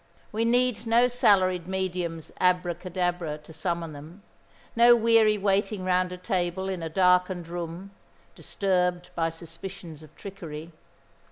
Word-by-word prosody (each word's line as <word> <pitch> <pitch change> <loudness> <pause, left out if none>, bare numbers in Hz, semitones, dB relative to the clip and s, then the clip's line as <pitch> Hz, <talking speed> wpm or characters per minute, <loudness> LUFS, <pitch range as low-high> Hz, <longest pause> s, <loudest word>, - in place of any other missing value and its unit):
We 225 +2 0
need 245 0 +1
no 235 +2 +5
salaried 190 -8 +2
medium's 180 -4 -3
abracadabra 175 -2 0
to 150 +2 -15
summon 170 -1 -3
them, 160 +7 -12 0.5
no 240 +1 +7
weary 225 -2 +4
waiting 195 0 0
round 180 0 +1
a 180 - -6
table 180 -1 -2
in 185 -2 -3
a 165 - -4
darkened 180 0 +2
room, 175 +3 -6 0.4
disturbed 180 -2 -1
by 165 -1 0
suspicions 165 0 -9
of 155 - -16
trickery. 170 -5 -8
180 Hz, 125 wpm, -26 LUFS, 170-195 Hz, 0.5 s, no